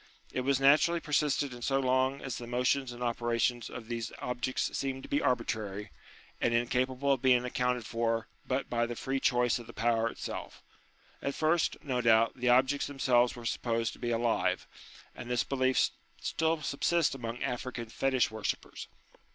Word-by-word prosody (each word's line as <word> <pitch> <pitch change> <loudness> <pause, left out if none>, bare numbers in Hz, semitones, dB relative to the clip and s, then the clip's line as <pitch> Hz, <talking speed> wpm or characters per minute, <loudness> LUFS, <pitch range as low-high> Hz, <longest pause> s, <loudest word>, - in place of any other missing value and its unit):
It 130 - -1
was 135 +1 +2
natu 140 +4 +6
rally 170 0 -1
persisted 145 -3 0
in 120 - -10
so 135 +2 +1
long 130 +1 +1
as 130 -4 -4
the 120 - -7
motions 125 +2 +1
and 120 0 -6
operations 120 0 0
of 115 -3 -8
these 115 -1 -3
objects 125 +1 -2
seemed 135 -1 -2
to - - -10
be 290 +1 +1
arbitrary, 105 - -1 0.5
and 120 - +2
incapable 130 +3 +1
of 135 - -2
being 125 -2 +4
accounted 125 -1 -1
for 115 0 -1 0.2
but 130 +1 -1
by 120 -1 0
the 120 - -5
free 135 +3 -2
choice 125 -4 +2
of 120 - -11
the - - -10
Power 115 0 +1
itself. - - -7 0.6
At 140 - -2
first, 160 +1 +2
no 130 -4 -1
doubt, 115 -1 +5
the 125 -1 0
objects 130 +3 +3
them 145 - -9
selves 125 -2 +3
were 120 -1 -9
supposed 115 -1 -1
to - - -14
be 120 - -2
alive; 115 0 +1 0.5
and 120 - -9
this 125 -1 +1
belief 130 -1 +2 0.3
still 160 -1 0
subsists 160 +3 +1
among 120 -2 -5
African 125 -1 -3
fetish 130 0 +1
worshippers. 110 -1 -4
125 Hz, 175 wpm, -31 LUFS, 120-135 Hz, 0.6 s, natu